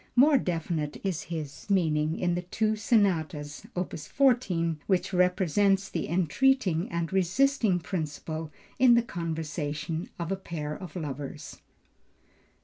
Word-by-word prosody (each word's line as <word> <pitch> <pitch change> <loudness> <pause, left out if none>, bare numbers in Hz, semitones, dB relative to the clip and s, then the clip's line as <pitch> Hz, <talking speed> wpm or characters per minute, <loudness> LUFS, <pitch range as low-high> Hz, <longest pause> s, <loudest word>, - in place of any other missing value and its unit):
More 275 +2 +6
definite 165 -5 -2
is 190 -5 -1
his 160 0 -6
meaning 160 -4 +2
in 175 -1 +1
the 175 - -1
two 215 +5 0
Sonatas 165 - 0
(opus 175 -4 -4
14), 185 - +2
which 190 0 +1
represents 190 +2 +2
the 165 - -3
entreating 185 - +2
and 170 +1 -2
resisting 195 +3 +2
principle 160 -2 -4 0.3
in 250 -2 +7
the 235 - +4
conversation 160 -1 -3
of 170 0 -4
a - - +2
pair 155 -5 -5
of 180 -1 -9
lovers. 145 -5 -6
175 Hz, 125 wpm, -28 LUFS, 160-195 Hz, 0.3 s, in